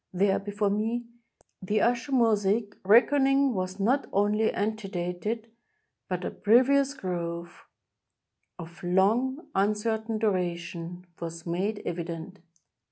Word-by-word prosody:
There, 195 +1 +2
before 205 0 -1
me, 225 +4 -1 0.6
the 205 +3 0
Usher 245 +3 +1
Mo 235 -4 +4
saic 205 +1 0
reckoning 270 +5 +4
was 185 0 -3
not 255 +8 +1
only 210 +2 +2
antedated, 205 +1 -3 0.6
but 180 -1 -2
a - - -2
previous 270 +5 +3
growth, 170 -3 -5 0.9
of 170 0 -10
long, 225 - +1
uncertain 220 +2 0
duration, 175 -3 -2
was 165 0 -6
made 190 +5 -2
evident. 170 +2 -5
205 Hz, 105 wpm, -28 LUFS, 180-230 Hz, 0.9 s, Mo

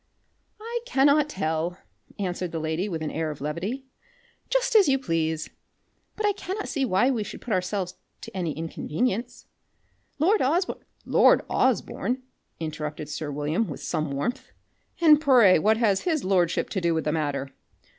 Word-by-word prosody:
"I 465 +2 -3
cannot 290 - +4
tell," 170 - -2 0.4
answered 180 -3 -3
the 165 - -3
lady 160 +5 -2
with 160 -3 -3
an 155 - -3
air 160 0 -2
of 150 - -6
levity. 180 - -4 0.6
"Just - - +1
as 415 -6 +7
you 270 - +4
please. 160 -9 -1 0.6
But 430 - -2
I 410 - +3
cannot 400 +1 -5
see 280 -4 0
why 235 +4 +3
we 230 -5 -1
should - - -8
put 235 - -3
ourselves 185 0 -1 0.3
to - - -10
any 170 -5 -1
inconvenience. 215 +9 -3 0.7
Lord 380 +9 +3
Osborne" 335 +8 0 0.2
"Lord - - +5
Osborne!" 255 +1 0 0.4
interrupted 155 -2 -5
sir 150 0 -4
William 150 +9 -1
with 150 - -7
some 155 -3 -1
warmth, 140 - -3 0.5
"and 305 -3 +6
pray 245 - +6
what 215 +6 +3
has 210 -5 +2
his 320 -5 0
lordship 180 -3 +1
to 190 - -1
do 170 -1 +1
with 160 - 0
the 150 - 0
matter?" 145 -3 -2
190 Hz, 160 wpm, -26 LUFS, -, 0.7 s, as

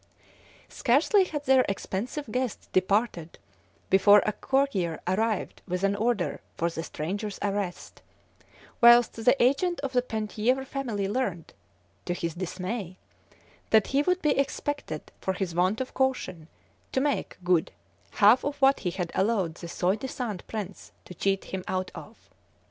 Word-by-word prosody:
Scarcely 320 - +3
had 295 -5 -5
their 260 -1 +5
expensive 220 +9 -3
guest 250 -2 -3
departed 185 -3 0 0.5
before 205 +2 +7
a 210 - +2
courier 210 - 0
arrived 210 +3 -1
with 180 +1 -2
an 200 0 +2
order 220 -2 -1 0.2
for 170 +1 0
the 165 - -4
stranger's 195 +6 -4
arrest, 200 -3 -3 0.8
whilst 235 0 +7
the 250 +4 +4
agent 280 +8 +2
of 275 -2 -4
the 250 - +3
Penthièvre 225 +3 -1
family 235 -8 -3
learnt, 200 -7 -3 0.5
to 175 - -1
his 170 -2 -3
dismay, 185 +2 -5 0.7
that 220 -2 +5
he 275 - +4
would 365 +4 0
be 300 - +3
expected, 280 - -3
for 190 - -1
his 185 -2 -3
want 185 +5 +1
of 260 - -4
caution, 255 -12 -1 0.4
to - - +1
make 285 +1 -1
good 175 -2 +2 0.4
half 215 +5 +5
of 285 0 -3
what 270 0 +5
he 180 - -2
had 175 -1 -4
allowed 195 -5 +1
the 170 +1 -9
soi 180 +3 0
disant 225 -5 -4
prince 200 -4 -6
to - - -10
cheat 195 +2 0
him 190 -1 -5
out 185 0 -2
of. - - -11
210 Hz, 150 wpm, -27 LUFS, 185-260 Hz, 0.8 s, before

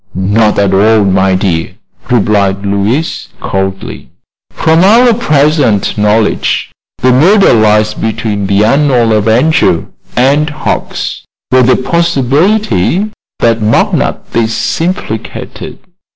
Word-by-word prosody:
"Not 105 +3 +1
at 100 -1 +1
all, 105 +2 +3
my 95 0 +1
dear," 90 -3 -2 0.3
replied 100 -4 0
Louise, 100 +10 -2
coldly. 95 0 -5 0.4
"From 160 +2 +1
our 235 +5 +5
present 150 - +1
knowledge 105 +1 0 0.3
the 130 - +1
murder 185 +11 +4
lies 110 -1 +2
between 110 -2 -3
the 100 +1 +2
unknown 130 -2 +2
avenger 110 - +1 0.3
and 140 +5 +2
Hucks, 150 - -4 0.3
with 130 -1 +3
the 130 - +4
possibility 170 - 0 0.3
that 115 -1 +1
McNutt 110 +1 0
is 115 +6 -1
implicated. 180 +4 -5
115 Hz, 105 wpm, -10 LUFS, 100-150 Hz, 0.4 s, our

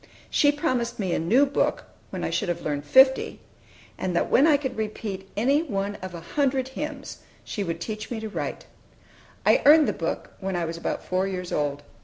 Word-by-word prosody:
She 290 - +4
promised 255 -6 -1
me 190 -5 -1
a - - +1
new 235 - +4
book, 280 - 0 0.3
when - - -5
I - - -1
should 200 -6 -1
have 175 - -2
learned 145 -1 -2
fifty; 265 - +5 0.6
and 180 -2 -2
that - - 0
when 280 +5 +6
I 300 -3 +5
could 265 -3 -4
repeat 210 -3 -5
any 275 +7 +3
one 200 -9 -2
of 185 -1 -6
a 170 - -7
hundred 265 - 0
hymns, 290 +1 -6 0.2
she 205 - -4
would 165 -2 -3
teach 215 +2 -5
me 235 - -3
to 220 - -5
write. 210 - -5 0.8
I - - +5
earned 305 +1 +7
the - - +1
book - - -4
when 190 -1 -3
I 175 -1 0
was 165 +1 -4
about 170 - -3
four 185 +1 0
years 180 -2 -4
old. 145 -1 -1
215 Hz, 205 wpm, -25 LUFS, 180-270 Hz, 0.8 s, earned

